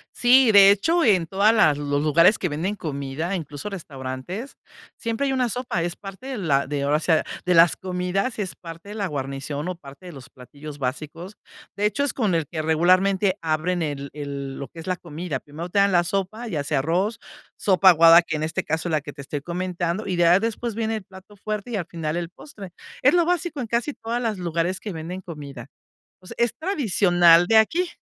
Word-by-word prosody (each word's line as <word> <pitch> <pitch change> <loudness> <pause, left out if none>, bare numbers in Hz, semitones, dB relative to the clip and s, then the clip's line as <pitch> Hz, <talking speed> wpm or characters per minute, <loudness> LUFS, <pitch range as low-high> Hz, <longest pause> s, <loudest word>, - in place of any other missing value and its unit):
Sí, 250 0 +5
de 200 -1 +8
hecho, 325 - +2
en 185 -8 +3
todas 200 +5 +3
las 155 -10 +4
los 145 0 -1
lugares 165 +7 +4
que 180 - -1
venden 170 +8 -2
comida, 155 +1 -4
incluso 150 +1 -6
restaurantes, 155 - -7 0.4
siempre 230 +4 -2
hay 270 - 0
una 255 -2 +1
sopa, 235 -8 -2
es 175 0 -3
parte 195 +4 -11
de 265 -3 -4
la 145 -8 +1
de, 140 0 -3
ahora 145 +2 +2
sí, 165 - -1 0.3
de 180 - +2
las 165 0 +5
comidas, 185 +5 -2
es 195 -3 -3
parte 165 +3 -11
de 210 - -7
la 205 -3 -2
guarnición 140 +1 -4
o 185 - -3
parte 140 +1 -14
de 175 - -8
los 135 -2 -12
platillos 145 +3 -11
básicos. 155 +9 -5 0.4
De 205 - -1
hecho, 215 +7 0
es 285 - -1
con 215 -8 0
el 165 -4 0
que 160 -2 -4
regularmente 185 +5 +2
abren 165 +2 -1
el 140 -2 -4
el 140 -2 -6
lo 140 - -6
que 165 - -13
es 165 - -9
la 185 - 0
comida. 160 -3 -5
Primero 155 +6 -8
te 200 - +1
dan 200 0 +4
la 175 -1 +4
sopa, 195 +6 -3
ya 155 -8 -2
sea 145 -1 0
arroz, 185 +10 -1 0.4
sopa 190 -1 +4
aguada, 165 0 +7
que 155 - -3
en 155 - -3
este 160 - -2
caso 160 +2 -2
es - - -3
la 155 - +1
que 145 +1 -9
te 145 - -10
estoy 140 +1 -5
comentando. 175 +3 -3
Y 185 - -1
ya, 175 +1 +5
después 230 +1 -3
viene 225 0 -2
el 215 - -5
plato 190 +2 -15
fuerte 215 +3 -5
y - - -2
al 180 -5 -2
final 165 -1 -4
el 170 -1 -4
postre, 195 -3 -12 0.3
es 280 - +5
lo 345 -1 +4
básico 350 -3 -1
en 245 - -3
casi 240 +6 -1
todas 235 +2 -4
las 220 -5 -2
lugares 175 +1 -1
que 205 -4 -6
venden 170 +4 -6
comida. 140 -8 -9 0.5
O 185 - -18
sea - - -9
es 235 -1 +2
tradicional 180 - +4
de 225 - +3
aquí. 330 +12 +3
180 Hz, 220 wpm, -23 LUFS, 155-210 Hz, 0.5 s, de